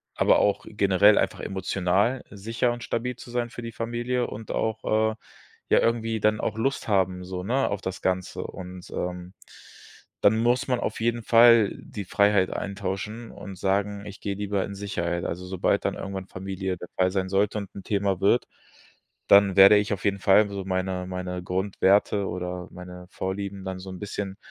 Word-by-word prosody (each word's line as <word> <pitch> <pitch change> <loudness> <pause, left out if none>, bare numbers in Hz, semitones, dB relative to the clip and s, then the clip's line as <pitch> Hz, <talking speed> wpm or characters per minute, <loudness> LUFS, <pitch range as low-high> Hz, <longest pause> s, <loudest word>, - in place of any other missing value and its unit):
aber - - +4
auch 100 - +1
generell 100 0 +4
einfach - - 0
emotional 95 +5 0
sicher 115 +4 -1
und 120 0 -6
stabil 125 +3 -2
zu 120 - -12
sein 120 -1 -1
für 120 - -8
die 115 - -5
Familie 120 +3 -2
und 110 +1 -7
auch, 110 0 0
äh, - - -13 0.5
ja, - - +5
irgendwie 115 -1 0
dann 105 +1 +2
auch 110 - -2
Lust 135 +3 -1
haben 95 -3 +1
so, 90 0 -5
ne, 130 +7 +1
auf 100 - -3
das 95 0 -5
Ganze. 95 -1 -1
Und, 90 -1 -9
ähm, 90 0 -5 0.9
dann 110 +2 +5
muss 120 +2 +2
man 125 -1 +1
auf - - -3
jeden 120 0 0
Fall 115 -2 +6
die 100 -2 -8
Freiheit 100 0 +3
eintauschen 100 +3 -4
und 95 -2 -9
sagen: 100 +2 -1
„Ich 100 -1 -10
gehe 100 -1 -3
lieber 100 -1 -1
in 100 - -7
Sicherheit.“ 85 -4 -3
Also 90 +2 -4
sobald 90 -1 0
dann - - 0
irgendwann 95 -1 -6
Familie 95 0 -4
dabei 90 +2 -1
sein 95 -1 -1
sollte 100 +2 +1
und 100 -2 -8
'n 100 - -8
Thema 100 -2 0
wird, 110 +5 +3 0.8
dann 100 -1 +6
werde 100 +2 +9
ich 105 +1 0
auf 100 - -5
jeden 100 -1 +1
Fall 100 +2 +5
so 100 -1 -5
meine 95 -1 -2
meine 90 -1 -4
Grundwerte 100 +2 +2
oder 90 0 -5
meine 90 0 -10
Vorlieben 95 +1 -4
dann 95 -1 -4
so 95 +1 -9
'n 90 - -8
bisschen 100 -1 -5
100 Hz, 180 wpm, -26 LUFS, 95-110 Hz, 0.9 s, werde